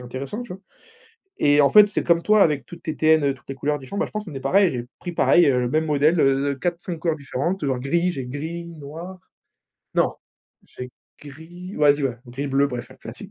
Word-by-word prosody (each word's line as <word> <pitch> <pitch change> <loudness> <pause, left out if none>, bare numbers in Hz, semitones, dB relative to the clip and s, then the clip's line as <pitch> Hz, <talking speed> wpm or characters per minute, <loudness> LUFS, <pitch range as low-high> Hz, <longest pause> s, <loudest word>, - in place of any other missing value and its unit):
intéressant, 130 - -6
tu 240 - -9
vois? 190 - -15 0.8
Et 145 0 +4
en 140 - +5
fait, 210 -1 +7
c'est 205 - -2
comme 170 -1 +3
toi 210 +1 +4
avec 145 -6 +1
toutes 175 +6 -12
tes 155 -2 -4
TN, 155 -3 +3
toutes 125 - -23
les 135 - -4
couleurs 145 +2 -1
différentes, 135 +10 -7
bah, - - +1
je - - -13
pense 215 0 -4
qu'on 165 -7 -9
est 135 - -5
pareil. 185 +7 +3
J'ai 120 -2 -5
pris 175 - -5
pareil, 175 0 +4
heu, 130 -3 +3
le 125 - -1
même 155 +4 0
modèle, 150 +3 +2
heu, 135 0 +2
de - - -1
4-5 170 +3 -4
couleurs 165 -2 0
différentes, 155 +6 -3
alors 130 -3 -1
gris 170 +7 0
j'ai 135 -5 -5
gris, 160 +6 -6
noir 165 +3 -9 0.8
non, - - +2 0.5
j'ai 125 0 -9 0.3
gris, 165 +6 -11
vas-y 145 -1 +3
ouais, 130 -3 -1
gris 135 +4 -5
bleu, 140 +1 +2
bref 125 -2 -6
un - - -13
classique - - -10
150 Hz, 225 wpm, -23 LUFS, 135-175 Hz, 0.8 s, fait